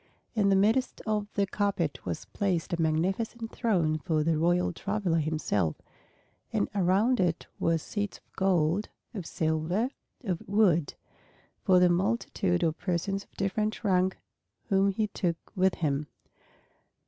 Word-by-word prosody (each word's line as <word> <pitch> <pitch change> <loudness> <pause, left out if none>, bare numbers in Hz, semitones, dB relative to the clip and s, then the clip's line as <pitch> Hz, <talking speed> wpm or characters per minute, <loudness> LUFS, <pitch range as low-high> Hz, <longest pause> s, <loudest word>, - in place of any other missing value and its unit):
In 210 -4 +3
the 195 - +5
midst 220 +7 +2
of 210 -2 0
this 200 -1 0
carpet 195 -7 -1
was 85 - -3
placed 180 -4 -1
a 170 - 0
magnificent 195 +9 -1
throne 170 -10 +1
for 155 -2 0
the 165 +1 +2
royal 175 +3 +2
traveler 195 -3 0
himself; 145 - 0 0.8
and 100 - +1
around 200 +6 +3
it 175 -3 +1
were 165 0 +2
seats 205 +5 -4
of - - -28
gold, 185 +1 +2 0.2
of 190 -7 -5
silver, 160 +9 0 0.3
of 185 -7 -2
wood, 185 -7 +3 0.7
for 185 - +5
the 180 0 +6
multitude 185 -1 +1
of 160 -1 0
persons 195 +2 -1
of - - -32
different 215 +3 -1
rank 190 -2 +2 0.5
whom 195 0 +4
he 215 +3 0
took 180 -4 -1 0.2
with 190 0 +3
him. 145 -2 -1
185 Hz, 140 wpm, -29 LUFS, 165-205 Hz, 0.8 s, the